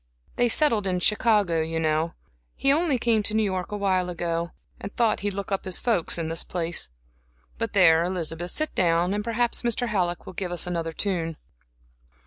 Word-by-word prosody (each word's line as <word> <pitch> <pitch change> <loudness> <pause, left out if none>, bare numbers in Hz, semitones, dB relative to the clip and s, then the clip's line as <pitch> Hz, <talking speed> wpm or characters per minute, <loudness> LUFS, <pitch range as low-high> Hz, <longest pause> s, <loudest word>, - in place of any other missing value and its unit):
They 245 0 +2
settled 230 -7 +4
in 180 -1 0
Chicago, 205 -4 +2
you 160 +1 -2
know. 160 +1 0 0.4
He 275 - +3
only 310 -3 +1
came 230 -2 +2
to 210 +1 -3
New 220 - +3
York 185 -1 -2
awhile 190 -3 0
ago, 170 -1 -2 0.3
and 200 - -7
thought 230 -3 +2
he'd 205 -1 -3
look 200 0 -5
up 195 - -1
his 185 -2 -2
folks 225 -11 +1
in 165 -1 -2
this 165 0 -1
place. 175 - -3 0.7
But 225 -1 -3
there, 165 -4 +5
Elizabeth, 175 -1 -3
sit 310 - 0
down, 175 +1 +2
and 210 0 -2
perhaps 235 +2 0
Mr. 240 0 0
Halleck 175 -5 -1
will - - -9
give 180 0 -4
us 175 - 0
another 170 -2 -3
tune." 165 -3 -1
185 Hz, 185 wpm, -25 LUFS, 170-215 Hz, 0.7 s, there